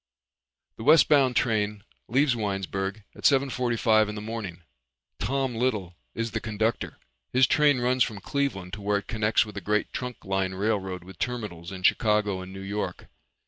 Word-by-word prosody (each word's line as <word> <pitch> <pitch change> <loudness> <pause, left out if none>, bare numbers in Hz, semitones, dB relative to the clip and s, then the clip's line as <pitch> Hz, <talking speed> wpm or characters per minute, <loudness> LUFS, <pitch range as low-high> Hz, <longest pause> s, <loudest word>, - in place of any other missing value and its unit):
The - - -7
westbound 140 -3 +5
train 105 -3 0 0.2
leaves 135 +1 +3
Winesburg 95 -1 -3
at - - -14
seven 135 -1 +4
forty 125 -2 -1
five 110 -2 +4
in 105 - -5
the - - -4
morning. 105 -5 -6 0.6
Tom 135 -2 -1
Little 110 -7 -1 0.2
is 115 0 -2
conductor. 110 0 -2 0.3
His 130 +1 +5
train 145 -3 +4
runs 125 +1 +3
from 105 -3 -4
Cleveland 100 -8 -2
to 105 - -5
where 100 0 +1
it 100 - -5
connects 110 0 +2
with 105 -2 -10
a - - -3
great 105 +3 0
trunk 125 -2 -5
line 95 -1 -1
railroad 95 -3 -1
with 90 -1 -13
terminals 105 -9 -4
in 95 -1 -8
Chicago 105 -1 +2
and 95 0 -9
New 95 0 -8
York. 95 -2 -4
105 Hz, 170 wpm, -27 LUFS, 95-125 Hz, 0.6 s, westbound